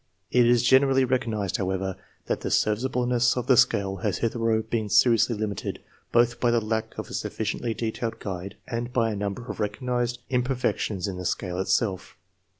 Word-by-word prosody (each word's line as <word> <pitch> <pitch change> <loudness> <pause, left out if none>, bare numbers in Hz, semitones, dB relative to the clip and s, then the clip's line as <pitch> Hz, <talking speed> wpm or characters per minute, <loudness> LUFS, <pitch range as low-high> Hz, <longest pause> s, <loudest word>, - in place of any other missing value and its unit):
It 125 -1 +5
is 120 -1 +4
generally 135 +1 +5
recognized, 115 -6 -1
however, 95 -1 -2 0.3
that - - -2
the - - -3
serviceableness 125 +2 +1
of 125 - -1
the 130 - +5
scale 100 -4 +3
has - - -1
hitherto 115 -1 0
been 110 -2 -1
seriously 115 +2 +4
limited, 105 -2 -3 0.3
both 120 0 +3
by 120 - +2
the 120 0 +3
lack 110 0 -3
of - - -6
a - - -7
sufficiently 115 -2 -2
detailed 115 0 -3
guide 95 0 -6
and 120 0 -3
by 115 -3 +1
a - - -3
number 100 +3 -4
of - - -7
recognized 120 +3 -1
imperfections 125 -6 0
in 95 -2 -4
the 90 - -6
scale 90 0 -2
itself. 95 0 -1
115 Hz, 170 wpm, -26 LUFS, 100-120 Hz, 0.3 s, It